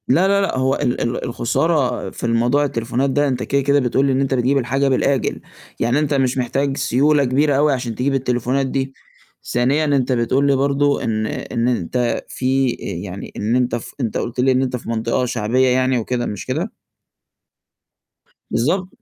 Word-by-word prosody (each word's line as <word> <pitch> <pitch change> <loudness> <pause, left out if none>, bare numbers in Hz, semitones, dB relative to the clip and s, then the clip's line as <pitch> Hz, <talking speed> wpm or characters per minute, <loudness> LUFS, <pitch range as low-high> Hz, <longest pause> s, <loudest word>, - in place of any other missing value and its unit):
لأ، 185 +3 +3
لأ، 200 0 +3
لأ، 195 - -1
هو 130 +1 +2
ال 120 - -1
ال 120 +1 -2
الخسارة 130 +4 0
في - - -11
الموضوع 120 +5 +2
التليفونات 125 +1 -1
ده 145 +2 +2
أنت 130 -2 -1
كده، 140 0 +1
كده 140 +1 +3
بتقول 130 +1 +1
لي 135 - +2
إن 130 +1 +1
أنت 135 -1 0
بتجيب 130 +2 +2
الحاجة 135 +2 0
بالآجِل، 135 -1 0 0.4
يعني 120 +5 +2
أنت 150 -1 0
مش 135 -2 +1
محتاج 135 +2 -1
سيولة 145 +4 +2
كبيرة 140 +3 +2
أوي 150 0 +3
عشان 125 -3 -3
تجيب 135 +4 0
التليفونات 130 +1 0
دي، 135 0 -2 0.6
ثانيًا 135 +6 +2
أنت 140 -3 +1
بتقول 130 +3 +1
لي 140 - +4
برضه 140 +1 +1
إن 110 -1 -1
إن 120 +1 -2
أنت 120 +1 -1
في 130 -1 0
آآ، 95 - -4
يعني 100 0 -8
إن 110 +4 0
أنت 125 -2 +1
ف 120 - -7
أنت 115 -3 -1
قُلت 120 +1 -4
لي 130 +1 +4
إن 130 0 +2
أنت 130 -1 -1
في 120 - -7
مَنطقة 115 +2 0
شعبيّة 125 +2 +1
يعني 130 0 +2
وكده 120 +1 -2
مش 105 -3 -5
كده؟ - - -2 1.8
بالضبط. 180 +10 0
130 Hz, 185 wpm, -20 LUFS, 120-140 Hz, 1.8 s, لي